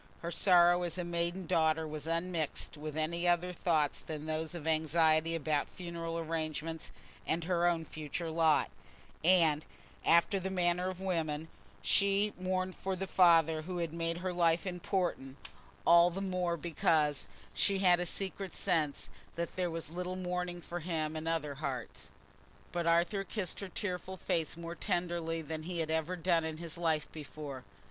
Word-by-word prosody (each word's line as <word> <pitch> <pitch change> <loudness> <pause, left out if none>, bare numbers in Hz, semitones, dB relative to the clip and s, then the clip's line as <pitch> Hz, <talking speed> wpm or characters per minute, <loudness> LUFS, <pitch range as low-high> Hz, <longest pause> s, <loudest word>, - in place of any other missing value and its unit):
Her 170 - -3
sorrow 175 -1 +5
as 175 -1 -1
a 180 - -1
maiden 175 +2 -2
daughter 160 0 +2
was 155 0 -6
unmixed 165 -2 -1
with 150 0 -6
any 170 +3 0
other 175 +1 +2
thoughts 155 -4 +1
than 155 -1 -6
those 155 +1 -3
of 160 -3 -6
anxiety 160 +1 +3
about 150 -2 0
funeral 170 -2 -5
arrangements 160 0 -3 0.4
and 165 +1 0
her 175 0 +2
own 165 -2 +1
future 155 +2 -4
lot; 160 -1 +3 0.5
and, 165 -4 +5 0.4
after 170 +4 +4
the 190 +1 -3
manner 180 -1 +1
of 185 0 -6
women, 160 -4 -1 0.3
she 200 +1 +3
mourned 185 0 -1
for 190 0 -2
the 190 +1 -3
father 165 -4 +5
who 180 +3 -5
had 165 -2 -2
made 165 0 -2
her 185 - 0
life 170 0 +2
important, 180 -7 -2 0.5
all 170 +1 +7
the 180 +2 -5
more 180 -3 -1
because 150 -5 +1 0.3
she 200 -1 +2
had 180 -2 +5
a 180 - -1
secret 195 +1 -4
sense 160 -7 -1 0.2
that 170 0 -3
there 180 -1 0
was 165 -2 -4
little 180 +1 -3
mourning 180 -1 -3
for 175 +1 -5
him 160 -2 -2
in 155 +1 -4
other 160 -3 -1
hearts. 135 -4 -5 0.6
But 170 -1 -1
Arthur 170 +4 +3
kissed 190 -2 -3
her 200 - -6
tearful 185 -1 -4
face 165 -2 -1
more 170 0 -5
tenderly 175 -3 -1
than 155 +1 -4
he 175 +2 -4
had 160 -1 -1
ever 160 +3 0
done 170 -1 +2
in 160 -1 -4
his 170 0 -7
life 160 -3 +1
before. 145 -3 -8
170 Hz, 165 wpm, -33 LUFS, 160-180 Hz, 0.6 s, all